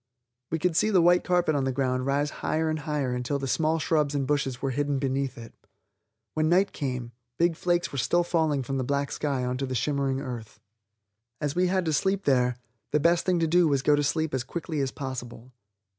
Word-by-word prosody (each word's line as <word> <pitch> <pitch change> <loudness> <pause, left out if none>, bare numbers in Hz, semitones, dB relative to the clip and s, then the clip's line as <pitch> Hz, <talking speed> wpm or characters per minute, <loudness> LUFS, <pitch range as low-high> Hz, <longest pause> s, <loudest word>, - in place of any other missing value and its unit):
We 165 - 0
could 165 +1 0
see 215 - +3
the 195 -4 +4
white 175 +1 +5
carpet 175 -3 +2
on 140 -2 +1
the 135 - 0
ground 130 0 -1
rise 145 +2 +1
higher 160 0 0
and 155 - -2
higher 145 -4 -2
until 125 +3 -1
the 135 -1 -4
small 155 +4 +1
shrubs 150 -2 +1
and 140 -1 0
bushes 135 -3 -1
were 135 - -1
hidden 145 +2 0
beneath 135 0 -1
it. 115 -1 -10 0.8
When 155 0 +1
night 190 +3 +3
came, 125 -4 -4 0.3
big 170 -1 +2
flakes 175 +1 0
were 140 - -3
still 175 +7 +2
falling 160 -5 +1
from 135 +1 -3
the - - 0
black 140 +2 -1
sky 140 -4 -1
onto 130 +2 -2
the 130 - -3
shimmering 135 +1 0
earth. 120 -5 -7 0.8
As 145 -1 -1
we 180 +1 +3
had 185 0 +1
to 160 - 0
sleep 195 +6 +1
there, 125 -4 +2 0.3
the 150 - +2
best 170 +4 +2
thing 180 -1 +3
to 165 - +2
do 175 +1 +4
was 140 -3 +1
to - - +3
go - - +6
to 145 - +1
sleep 155 +1 0
as 130 -2 0
quickly 160 +2 -4
as 135 -1 0
possible. 130 -2 -7
145 Hz, 220 wpm, -27 LUFS, 130-165 Hz, 0.8 s, go